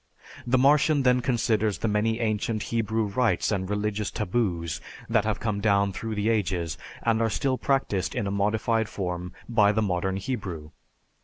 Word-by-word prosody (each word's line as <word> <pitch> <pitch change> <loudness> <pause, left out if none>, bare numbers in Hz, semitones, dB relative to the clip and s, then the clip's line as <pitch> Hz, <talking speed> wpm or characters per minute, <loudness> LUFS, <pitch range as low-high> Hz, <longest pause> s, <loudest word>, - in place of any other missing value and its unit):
The 125 +2 +3
Martian 145 +2 +4
then 125 -1 +4
considers 110 -4 +1
the - - -1
many 110 +2 +1
ancient 110 -1 -1
Hebrew 110 -1 +1
rites 110 +4 +1
and 95 -2 -1
religious 105 0 -1
taboos 90 -6 -1 0.3
that 115 -2 +2
have 110 -1 -1
come 105 -3 -2
down 100 -2 +2
through 110 +2 -4
the 105 +1 -1
ages, 90 -7 0 0.3
and 115 -1 +2
are 115 - +2
still 130 +3 0
practiced 135 -9 0
in - - -1
a 100 - -2
modified 110 +2 +1
form 90 -3 -4 0.2
by 105 -4 +4
the 110 +1 +1
modern 95 0 -1
Hebrew. 95 -9 -5
105 Hz, 165 wpm, -26 LUFS, 100-115 Hz, 0.3 s, Martian